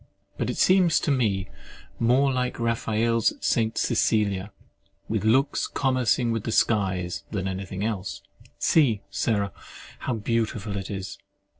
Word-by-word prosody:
But - - -2
it - - -3
seems 180 -3 +4
to - - 0
me 105 -8 +1 0.5
more 130 +4 +3
like 125 -1 -2
Raphael's 115 -1 +1
St. 110 -1 0
Cecilia, 100 -2 +1 0.6
"with - - -1
looks 130 +6 +2
commercing 130 -3 +1
with 115 -2 -2
the 115 - -3
skies," 95 -6 +1
than 95 -3 -3
anything 95 +1 -4
else.—See, 110 - -1
Sarah, 100 -3 0 0.5
how 125 - -2
beautiful 110 -2 -2
it 95 -1 -4
is! 95 -1 -6
110 Hz, 125 wpm, -25 LUFS, 100-120 Hz, 0.6 s, seems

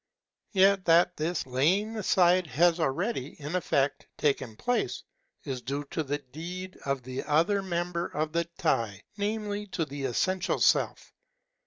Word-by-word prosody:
Yet 195 0 +4
that 175 +1 +5
this 160 +2 -2
laying 175 - +1
aside 185 -4 +3
has 165 +6 +3
already, 160 - -1
in 150 +4 -4
effect, 145 -6 0
taken 135 -6 0
place, 245 - -1 0.4
is 130 -4 -4
due 140 +3 -3
to - - -1
the 145 -1 -2
deed 170 +7 -7
of 140 -2 -1
the 130 +1 -4
other 165 +7 +2
member 175 -2 -2
of 155 +1 -2
the 170 0 +1
Tie, 115 - -1
namely 210 0 -2
to 170 -4 -2
the 140 -1 -5
essential 185 +9 0
Self. - - +2
170 Hz, 145 wpm, -28 LUFS, 140-185 Hz, 0.4 s, that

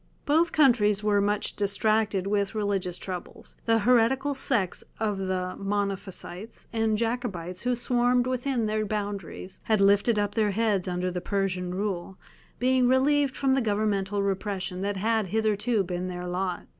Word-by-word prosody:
Both 325 +3 +3
countries 215 -8 +4
were 205 -1 +3
much 205 +1 0
distracted 205 -1 +1
with 200 +1 0
religious 195 -4 -1
troubles; 180 -2 -8
the 225 0 +4
heretical 250 +5 +3
sects 235 -8 -1 0.2
of 210 -3 -1
the 185 -1 -2
Monophysites 195 0 -4
and 225 -1 +1
Jacobites 210 -7 -3
who 250 0 0
swarmed 245 0 +2
within 255 -1 -1
their 215 0 0
boundaries 200 -3 -5
had 220 -2 +2
lifted 200 +3 +4
up 205 -1 0
their 215 -2 +2
heads 205 -2 0
under 180 0 -1
the 180 0 -4
Persian 185 -2 -2
rule, 190 -2 -3 0.4
being 255 0 +3
relieved 275 +2 +2
from 270 -1 +2
the 270 - +2
governmental 205 -2 0
repression 195 -2 -2
that 200 0 -2
had 220 +1 +1
hitherto 215 +1 +1
been 180 0 -3
their 180 -1 -5
lot. 180 0 -3
205 Hz, 150 wpm, -27 LUFS, 190-230 Hz, 0.4 s, countries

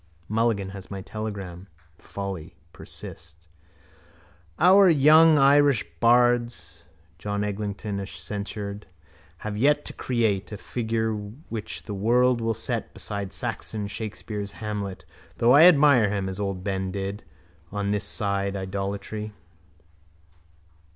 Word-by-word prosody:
Mulligan 110 -3 0
has 95 -1 -10
my 100 -1 -6
telegram. 100 -4 -6 0.3
Folly. 95 -5 -6 0.2
Persist. 85 +1 -10 1.1
—Our 190 +2 +7
young 155 +1 +6
Irish 140 -3 +5
bards, 120 0 +2 0.3
John 100 +2 -2
Eglinton 100 0 -3
censured, 100 0 -6 0.6
have 105 -1 -3
yet 145 +6 +2
to - - -6
create 110 -6 -1
a 105 - -5
figure 110 0 -2 0.4
which 110 -3 -5
the 105 - -6
world 120 +4 +2
will 115 0 0
set 115 +1 -3
beside 100 -2 -4
Saxon 105 -2 -4
Shakespeare's 105 0 -5
Hamlet 105 -3 -5 0.3
though 120 +1 +4
I 145 +5 +8
admire 140 - +6
him, 100 -2 -2
as 95 +1 -5
old 100 -2 -3
Ben 95 -1 -2
did, 100 +2 -4 0.5
on 100 -1 -2
this 105 0 0
side 100 -1 -1
idolatry. 100 +2 -4
105 Hz, 115 wpm, -25 LUFS, 100-120 Hz, 1.1 s, I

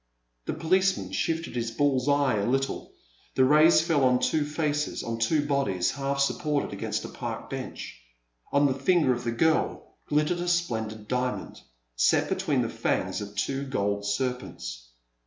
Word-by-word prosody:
'* - - -49
The - - -1
policeman 185 +4 +1
shifted 165 -4 -2
his 115 -1 -1
bull's 135 +2 +1
eye 140 -5 +3
a 100 - 0
little; 135 +1 -1 0.4
the 130 - +5
rays 155 +5 +6
fell 160 -4 +1
on 125 -1 +4
two 150 +3 +1
faces, 150 0 -1
on 115 0 -4
two 145 +6 +2
bodies, 135 -11 +1
half 140 +1 -2
sup 140 - +1
ported 150 -2 -1
against - - -3
a - - -4
park - - -6
bench. - - -6 0.5
On 140 +1 +4
the 135 - +3
finger 135 +1 +3
of 120 - -5
the 115 - -1
girl 160 +7 0
glittered 150 +4 +1
a 175 - -3
splendid 110 -11 -1
diamond, 125 +1 -2 0.3
set - - +3
between - - +1
the - - -1
fangs - - -1
of 105 0 -8
two 135 +7 -1
gold 100 -6 -1
serpents. 100 - -3
135 Hz, 170 wpm, -27 LUFS, 115-150 Hz, 0.5 s, rays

